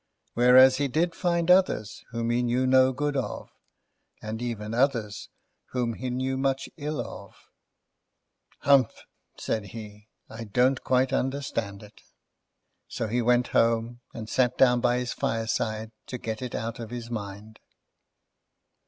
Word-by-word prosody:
Whereas, 130 +2 +7
he 140 0 +1
did 165 +6 0
find 170 -1 +1
others 180 - +2
whom 115 0 -2
he 120 +1 +1
knew 125 +1 +1
no 130 0 +5
good 145 +2 -2
of, 135 - -4 0.7
and 110 +2 -6
even 115 -3 -4
others 115 -5 0 0.4
whom 120 -2 0
he 125 +3 -5
knew 130 +1 -2
much 135 0 -1
ill 150 -2 -4
of. 120 - -7 1.3
"Humph!" 135 -4 +3 0.3
said 110 -2 -2
he. 105 -1 -10 0.2
"I 115 +1 -8
don't 125 +5 +2
quite 130 0 +2
understand 115 -7 -2
it." 105 +1 -16 0.9
So, 115 - -3
he 120 +3 0
went 120 +1 +2
home, 115 +1 +1
and 110 -2 -7
sat 125 +1 +1
down 125 -2 +4
by 120 0 +2
his 125 -1 -2
fireside 110 -1 -2 0.2
to 125 - -5
get 110 -1 -5
it 125 -2 -5
out 115 +1 -4
of 115 -2 -6
his 120 0 -7
mind. 105 0 -7
120 Hz, 145 wpm, -27 LUFS, 110-130 Hz, 1.3 s, Whereas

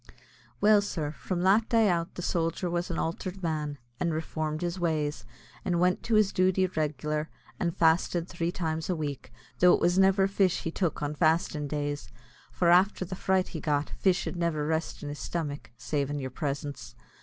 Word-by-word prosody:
Well, 210 0 +6
sir, 160 -7 -3
from 175 +3 -4
that 205 +4 +4
day 225 -3 +4
out 170 -2 0
the 175 - -5
sojer 170 +1 -1
was 175 0 -1
an 170 - -3
altered 185 +3 -3
man, 150 -3 -2 0.2
and 170 - 0
reformed 155 0 -3
his 175 +1 -2
ways, 155 -3 -1 0.4
and 175 -2 0
went 180 +1 +2
to 230 - +2
his 215 -2 +4
duty 185 0 +3
reg'lar, 155 -2 -2 0.3
and 170 -2 -1
fasted 165 +1 +2
three 170 -1 -2
times 160 -2 -3
a 180 - +1
week 145 -6 -5 0.3
though 180 0 +7
it - - -2
was 175 +2 +3
never 195 0 +5
fish 195 -2 +1
he 165 - -2
tuk 170 -4 -1
an 145 +1 -1
fastin' 155 -1 +1
days, 145 0 -3 0.4
for 170 -1 +2
afther 185 +2 +4
the 185 - -6
fright 190 0 +1
he 160 - -5
got, 150 -1 0
fish 185 -2 +1
id - - -4
never 165 -3 0
rest 160 0 -2
an 145 - -4
his 145 - -6
stomach 150 -4 -4
savin' 145 +3 -2
your 130 -2 -4
presence. 140 0 -4
170 Hz, 190 wpm, -28 LUFS, 150-185 Hz, 0.4 s, though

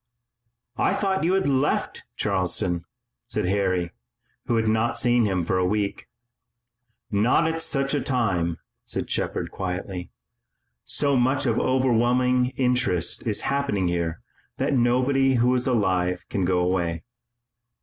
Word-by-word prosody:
"I - - +2
thought 190 -3 0
you 175 +3 +2
had 195 - +1
left 140 +1 0
Charleston," 90 -3 -1 0.4
said - - -1
Harry, 95 -2 0 0.6
who 120 - +1
had 110 -1 +1
not 110 +2 +1
seen 120 -1 +3
him 95 -4 0
for 90 - +1
a - - +2
week. 100 0 -2 1.0
"Not 115 +10 +3
at 160 0 -1
such 135 -3 0
a 145 - +1
time," 95 -11 0 0.3
said - - -4
Shepard, - - -2
quietly. 90 -1 -5 0.8
"So 140 -1 0
much 130 +3 +2
of - - +1
overwhelming 125 0 +2
interest 125 -9 0
is 105 - 0
happening 140 -10 0
here 85 -2 -2 0.3
that - - 0
nobody 130 +2 +2
who 125 +1 +3
is 125 0 0
alive 95 -7 0
can 95 - -1
go 90 0 +2
away." 85 -2 -1
115 Hz, 135 wpm, -24 LUFS, 90-130 Hz, 1.0 s, seen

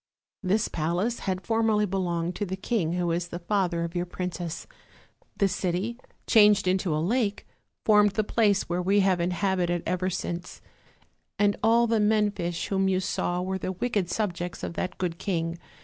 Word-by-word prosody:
This 205 +3 +1
palace 175 +9 -1
had 185 0 -2
formerly 225 -2 +2
belonged 175 -3 -1
to 205 - -1
the 190 - -3
king 190 -4 -1
who 175 -1 0
is 170 +1 -1
the 175 - -6
father 175 -2 0
of 170 +1 -5
your 175 0 -1
princess; 175 -2 -4 0.7
the 200 - +3
city, 190 +5 -2 0.3
changed 210 -3 +5
into 185 -3 +1
a - - 0
lake, 205 +5 0 0.4
formed 210 -2 +5
the 215 - +1
place 205 -2 +2
which 175 +1 -2
we 200 +2 +3
have 190 -2 +2
inhabited 180 -1 0
ever 185 +1 0
since; 175 -1 -5 0.8
and 205 0 +3
all 230 +2 +4
the 225 -1 +1
men 210 0 +3
fish 175 -4 -3
whom 195 -1 +1
you 185 -1 +2
saw 180 -1 -1
were 190 +1 -2
the 185 - -3
wicked 200 -2 -1
subjects 175 -3 -3
of - - -3
that 185 +1 -3
good 175 -2 -3
king. 170 -3 -2
185 Hz, 175 wpm, -27 LUFS, 175-205 Hz, 0.8 s, changed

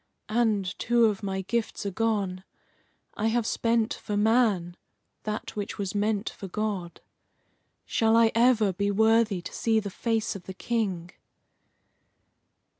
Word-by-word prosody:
And 215 -3 +2
two 240 0 +3
of 210 -2 0
my 190 -1 -3
gifts 225 +1 -2
are 200 - -1
gone. 195 -3 -1 0.7
I 215 - -1
have 230 0 +1
spent 230 0 +1
for 210 -2 -4
man 210 -6 +2 0.5
that 215 0 -4
which 205 -1 -4
was 195 -2 -3
meant 205 0 0
for 195 - -6
God. 195 -3 -4 0.8
Shall 225 0 +2
I 230 -1 +5
ever 230 -4 +4
be 200 +3 -1
worthy 220 -2 +3
to - - -8
see 225 -1 +2
the 205 -2 -5
face 225 +1 -1
of 190 - -9
the 190 - -8
King?" 190 -8 -2
215 Hz, 140 wpm, -27 LUFS, 195-225 Hz, 0.8 s, I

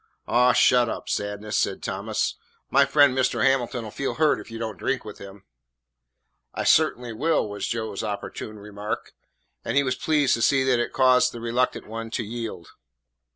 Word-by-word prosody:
"Aw, 125 +1 +4
shut 125 -2 +4
up, - - -5
Sadness," 105 +1 -3
said - - 0
Thomas. - - -2 0.4
"My - - +5
friend 145 -3 +4
Mr. 130 -1 +1
Hamilton 125 -3 +1
'll 105 - -8
feel 140 - -3
hurt 155 -1 +2
if - - -11
you 115 - -7
don't 110 -5 -5
drink - - -2
with - - -9
him." 100 0 -11 1.1
"I - - -2
cert'n'y 120 -1 +2
will," 155 +1 +1
was 100 0 -4
Joe's 110 -4 -3
opportune 105 +1 -5
remark, 105 0 -6 0.5
and - - -1
he 140 - +5
was 130 -1 0
pleased 145 +1 +1
to 115 - 0
see 135 +3 +3
that 130 -2 +2
it 120 - -1
caused 130 -1 +4
the 120 - -7
reluctant 120 +2 -1
one 115 +1 -6
to 115 - -2
yield. 110 -6 -6
120 Hz, 180 wpm, -24 LUFS, 105-130 Hz, 1.1 s, My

